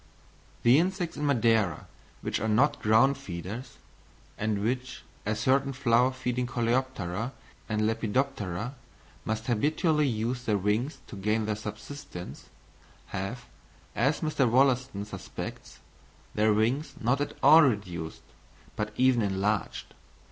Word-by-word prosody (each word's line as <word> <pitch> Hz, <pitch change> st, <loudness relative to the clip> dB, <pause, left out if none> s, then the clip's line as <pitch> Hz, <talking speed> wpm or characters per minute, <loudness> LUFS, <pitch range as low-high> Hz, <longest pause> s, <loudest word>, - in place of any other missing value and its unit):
The 120 Hz, +4 st, +6 dB
insects 180 Hz, -1 st, -1 dB
in 150 Hz, -, -1 dB
Madeira 115 Hz, -, +2 dB, 0.4 s
which -, -, -2 dB
are 110 Hz, -, -1 dB
not 120 Hz, +7 st, +3 dB
ground 120 Hz, +6 st, +4 dB
feeders, 100 Hz, +2 st, -7 dB, 0.6 s
and 105 Hz, -1 st, -1 dB
which, 125 Hz, +3 st, -2 dB, 0.2 s
as 110 Hz, 0 st, 0 dB
certain 135 Hz, +4 st, +2 dB
flower 125 Hz, -1 st, +3 dB
feeding 125 Hz, -1 st, -2 dB
coleoptera 120 Hz, -3 st, -1 dB, 0.4 s
and 110 Hz, 0 st, +1 dB
lepidoptera, 115 Hz, -1 st, -1 dB, 0.5 s
must 110 Hz, +1 st, -2 dB
habitually 150 Hz, -, +2 dB
use 120 Hz, +1 st, -1 dB
their 105 Hz, -2 st, +2 dB
wings 105 Hz, -, 0 dB
to -, -, -10 dB
gain 105 Hz, +3 st, 0 dB
their 105 Hz, 0 st, -1 dB
subsistence, 105 Hz, -1 st, -8 dB, 0.6 s
have, 100 Hz, +6 st, -4 dB, 0.5 s
as 135 Hz, +6 st, +1 dB
Mr. 150 Hz, -5 st, +1 dB
Wollaston 125 Hz, -4 st, +2 dB
suspects, 105 Hz, -, -8 dB, 0.6 s
their 110 Hz, +1 st, +3 dB
wings 115 Hz, +8 st, +1 dB
not 125 Hz, +5 st, +1 dB
at 145 Hz, -, -3 dB
all 160 Hz, +1 st, +9 dB
reduced, 90 Hz, -, -1 dB, 0.5 s
but 105 Hz, 0 st, -3 dB
even 130 Hz, -2 st, +4 dB
enlarged. 100 Hz, +1 st, -1 dB
115 Hz, 120 wpm, -28 LUFS, 105-135 Hz, 0.6 s, all